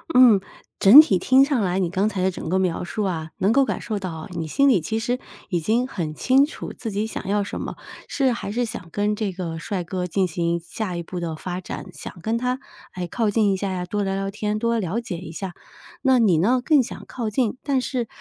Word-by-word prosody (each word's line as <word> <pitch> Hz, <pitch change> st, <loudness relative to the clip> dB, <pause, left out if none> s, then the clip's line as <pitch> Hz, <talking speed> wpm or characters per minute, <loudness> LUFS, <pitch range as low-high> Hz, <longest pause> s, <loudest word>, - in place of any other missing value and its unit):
嗯， 240 Hz, -6 st, +8 dB, 0.4 s
整 240 Hz, +10 st, +11 dB
体 195 Hz, -, +1 dB
听 260 Hz, +8 st, +5 dB
上 275 Hz, -4 st, +1 dB
来 185 Hz, -1 st, 0 dB
你 180 Hz, -3 st, 0 dB
刚 190 Hz, +3 st, +1 dB
才 195 Hz, -4 st, -2 dB
的 190 Hz, -, +2 dB
整 170 Hz, -, -7 dB
个 185 Hz, +3 st, +1 dB
描 180 Hz, -1 st, -1 dB
述 210 Hz, +4 st, -3 dB
啊， 160 Hz, -4 st, -3 dB
能 200 Hz, +3 st, +3 dB
够 275 Hz, +2 st, +4 dB
感 -, -, -3 dB
受 215 Hz, -3 st, -3 dB
到 170 Hz, -3 st, -6 dB
你 165 Hz, -2 st, -4 dB
心 275 Hz, -, +3 dB
里 220 Hz, -9 st, +5 dB
其 220 Hz, +7 st, -2 dB
实 245 Hz, +2 st, -1 dB, 0.3 s
已 175 Hz, -, 0 dB
经 225 Hz, +9 st, +1 dB
很 170 Hz, -11 st, -4 dB
清 265 Hz, +2 st, +4 dB
楚 310 Hz, -, -7 dB
自 225 Hz, -, -6 dB
己 205 Hz, +2 st, -1 dB
想 220 Hz, -, -6 dB
要 205 Hz, +1 st, +1 dB
什 200 Hz, -, -5 dB
么， -, -, -5 dB, 0.3 s
是 265 Hz, -3 st, +1 dB
还 235 Hz, -, -4 dB
是 240 Hz, +4 st, 0 dB
想 220 Hz, -7 st, -5 dB
跟 205 Hz, +3 st, 0 dB
这 205 Hz, -4 st, -2 dB
个 170 Hz, -3 st, -5 dB
帅 185 Hz, +2 st, -3 dB
哥 180 Hz, +1 st, -3 dB
进 190 Hz, +2 st, +1 dB
行 170 Hz, 0 st, -1 dB
下 180 Hz, +2 st, -4 dB
一 170 Hz, -, -3 dB
步 180 Hz, +2 st, -6 dB
的 165 Hz, -2 st, -3 dB
发 180 Hz, +3 st, -5 dB
展， 185 Hz, -, -7 dB
想 175 Hz, +3 st, -9 dB
跟 225 Hz, +5 st, 0 dB
他 250 Hz, +1 st, -1 dB, 0.4 s
来 180 Hz, -, -3 dB
靠 215 Hz, +5 st, 0 dB
近 205 Hz, -1 st, +2 dB
一 190 Hz, -, 0 dB
下 195 Hz, +1 st, -2 dB
呀， 180 Hz, -1 st, -3 dB
多 205 Hz, +3 st, -2 dB
聊 195 Hz, -1 st, -1 dB
聊 195 Hz, 0 st, -2 dB
天， 210 Hz, +1 st, -2 dB
多 230 Hz, +1 st, +1 dB
了 200 Hz, +5 st, -2 dB
解 180 Hz, -7 st, -5 dB
一 170 Hz, -2 st, -8 dB
下。 180 Hz, +3 st, -5 dB, 0.5 s
那 260 Hz, -2 st, +4 dB
你 195 Hz, -8 st, +4 dB
呢， 245 Hz, +9 st, +3 dB
更 295 Hz, -3 st, +5 dB
想 245 Hz, -, -6 dB
靠 230 Hz, -4 st, -4 dB
近， 235 Hz, +2 st, 0 dB
但 275 Hz, -3 st, 0 dB
是 250 Hz, -3 st, -2 dB
200 Hz, 265 characters per minute, -23 LUFS, 180-235 Hz, 0.5 s, 整